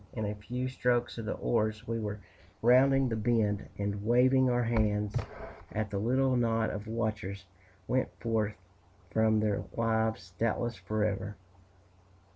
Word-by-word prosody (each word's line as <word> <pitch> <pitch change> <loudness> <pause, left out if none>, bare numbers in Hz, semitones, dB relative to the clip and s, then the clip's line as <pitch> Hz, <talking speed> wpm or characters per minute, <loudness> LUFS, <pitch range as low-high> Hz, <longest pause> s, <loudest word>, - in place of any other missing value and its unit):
In 110 -2 -2
a 105 - -2
few 125 +5 -4
strokes 120 -2 0
of 115 - -5
the 110 - -2
oars 110 - 0
we 115 0 -1
were 105 -1 -4 0.4
rounding 135 +2 +5
the 115 - -1
bend; 110 -2 +1
and 100 0 -2
waving 130 +3 +4
our 120 0 +2
hands 105 -3 +1 0.6
at 105 -1 -2
the 100 - -1
little 130 +4 +2
knot 115 -2 +1
of 105 +1 -6
watchers, 105 -3 -3 0.4
went 130 0 +1
forth 110 -2 0 0.6
from 110 -1 +3
their 105 -2 0
lives, 110 -5 0
doubtless 115 +1 0
forever. 105 +1 -2
110 Hz, 140 wpm, -31 LUFS, 105-120 Hz, 0.6 s, rounding